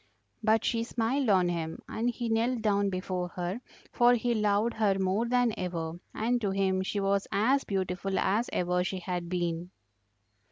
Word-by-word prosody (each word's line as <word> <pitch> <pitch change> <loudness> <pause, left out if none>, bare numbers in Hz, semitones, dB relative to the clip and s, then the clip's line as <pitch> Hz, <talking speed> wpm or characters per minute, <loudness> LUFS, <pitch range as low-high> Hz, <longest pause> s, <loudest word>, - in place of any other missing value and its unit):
But 220 0 +3
she 230 -1 +1
smiled 240 +3 0
on 185 -3 +4
him, 165 -2 -2
and 235 +2 -1
he 240 0 -3
knelt 230 +1 0
down 200 -2 +2
before 185 -1 -3
her, 180 +6 -3 0.3
for 240 0 +5
he 240 0 0
loved 210 +1 +1
her 205 -3 +2
more 195 +5 +1
than 245 -2 +2
ever, 170 -2 -4 0.2
and 240 +2 0
to 205 - 0
him 190 -1 +1
she 195 +2 -2
was 195 0 +1
as 255 +8 +2
beautiful 190 0 -2
as 210 +5 +1
ever 180 0 +1
she 190 +1 -3
had 180 -1 -4
been. 175 -1 -2
200 Hz, 170 wpm, -29 LUFS, 180-230 Hz, 0.3 s, for